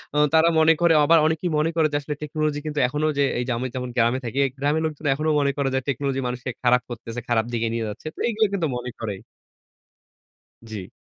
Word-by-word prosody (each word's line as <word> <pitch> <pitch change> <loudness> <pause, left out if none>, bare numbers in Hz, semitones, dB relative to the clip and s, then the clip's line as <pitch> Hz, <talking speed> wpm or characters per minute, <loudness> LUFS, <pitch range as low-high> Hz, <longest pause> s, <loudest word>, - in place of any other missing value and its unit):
আ - - +1 0.2
তারা 160 +1 +5
মনে 160 +1 +6
করে 170 -1 +5
আবার 165 +3 +5
অনেকেই 160 +3 0
মনে 155 +2 +2
করে 160 -2 +3
যে 145 - +2
আসলে 150 +1 -4
টেকনোলজি 150 0 -2
কিন্তু 150 -1 -2
এখনো 150 +4 -2
যে 140 - +3 0.2
এই - - 0
যে - - -1
আমি 130 +2 -2
যেমন 125 -1 -3
গ্রামে 120 +2 +3
থাকি। 120 +3 -5
এই - - -1
গ্রামের 145 +3 +1
লোকজন 155 0 -5
এখনো 155 +2 -1
মনে 140 -1 +2
করে 140 -1 0
যে - - +3
টেকনোলজি 135 0 -1
মানুষকে 125 0 -4
খারাপ 125 0 +4
করতেছে, 115 0 -6
খারাপ 115 -2 +2
দিকে 115 -1 0
নিয়ে 115 -1 -2
যাচ্ছে। 110 +8 -8
তো - - -14
এগুলো 220 -2 +2
কিন্তু 175 -5 0
মনে 125 0 -5
করেই। 105 -4 -4 1.5
জি। 100 -4 -6
140 Hz, 225 wpm, -23 LUFS, 120-155 Hz, 1.5 s, মনে